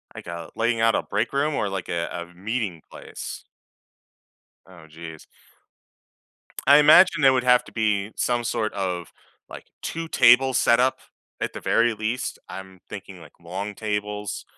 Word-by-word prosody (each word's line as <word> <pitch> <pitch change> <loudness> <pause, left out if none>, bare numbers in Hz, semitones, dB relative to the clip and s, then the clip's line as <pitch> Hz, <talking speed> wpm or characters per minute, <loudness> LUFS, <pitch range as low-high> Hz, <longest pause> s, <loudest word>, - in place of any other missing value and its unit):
Like - - -10
a 85 -1 -7
laying 115 0 0
out 115 0 +3
a - - 0
break 105 +6 -2
room 145 +2 +1
or 105 - -1
like 95 -2 -5
a 85 -1 -2
a 85 +1 -7
meeting 100 -2 -4
place? - - -9 1.2
Oh, 90 -4 -15
jeez. 80 0 -11 1.4
I 145 +1 +8
imagine 155 +3 +6
there 135 -1 +7
would 130 -1 +1
have 125 -1 +5
to - - -14
be 105 -2 0
some 120 -1 0
sort 110 -1 -2
of, 90 -3 -4 0.4
like, - - -10 0.2
two-table 135 -5 +3
setup 125 +2 +3 0.4
at - - -3
the - - -7
very 115 0 +2
least, 110 +4 -3
I'm 95 -1 -9
thinking 95 -3 -9
like 80 - -15
long 95 +4 -6
tables, 105 -1 -4
105 Hz, 150 wpm, -24 LUFS, 95-125 Hz, 1.4 s, I